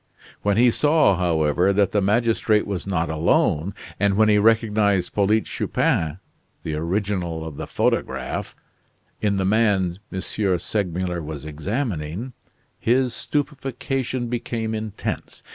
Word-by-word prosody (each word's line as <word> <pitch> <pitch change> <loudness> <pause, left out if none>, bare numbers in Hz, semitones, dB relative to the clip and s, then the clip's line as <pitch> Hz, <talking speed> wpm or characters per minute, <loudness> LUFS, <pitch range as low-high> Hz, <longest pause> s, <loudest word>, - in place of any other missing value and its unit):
When 100 0 +1
he 120 +1 +6
saw, 150 -6 +4
however, 85 0 +2
that 100 -1 +2
the 105 - +2
magistrate 110 +1 +2
was 100 -3 -4
not 85 -4 0
alone, 80 +2 +1 0.2
and 100 -1 +2
when 110 0 +5
he 105 -1 +5
recognized 105 -4 +2
Polyte 105 +2 +2
Chupin 80 0 0 0.5
the 80 - -3
original 85 0 -2
of 75 -3 -7
the - - -5
photograph - - -1 0.7
in 100 -2 +1
the 95 - 0
man 100 -4 +2
M. 95 - -3
Segmuller 90 -2 -1
was 75 -2 -7
examining, 95 - -3 0.5
his 125 +1 +2
stupefaction 135 -3 -2
became 115 -2 -3
intense. 110 -2 -5
100 Hz, 125 wpm, -23 LUFS, 85-115 Hz, 0.7 s, he